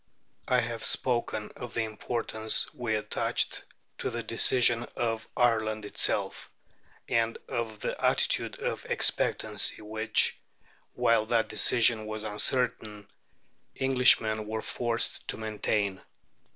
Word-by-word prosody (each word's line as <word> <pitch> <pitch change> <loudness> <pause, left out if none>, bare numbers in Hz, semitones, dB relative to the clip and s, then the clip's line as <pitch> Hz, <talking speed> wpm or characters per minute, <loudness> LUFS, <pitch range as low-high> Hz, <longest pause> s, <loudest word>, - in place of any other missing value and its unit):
I 125 -1 +3
have 115 0 -5
spoken 120 -4 0
of 120 -2 -9
the 115 - +1
importance 110 0 -1
we 115 -3 -2
attached 105 0 -1 0.3
to - - -2
the 120 -1 -4
decision 120 +1 +2
of 115 -1 -2
Ireland 110 -3 +1
itself, - - -1 0.6
and 115 0 0
of 110 -3 -4
the - - -4
attitude - - +3
of - - -4
expectancy - - +1
which, 110 +1 +1 0.6
while 115 -2 +2
that 115 -2 +1
decision 115 -2 +3
was 110 0 -5
uncertain, 105 -1 -2 0.7
Englishmen 125 -5 +4
were 110 0 -4
forced 120 -1 -2
to - - -2
maintain. 105 -3 -2
110 Hz, 110 wpm, -28 LUFS, 110-120 Hz, 0.7 s, Englishmen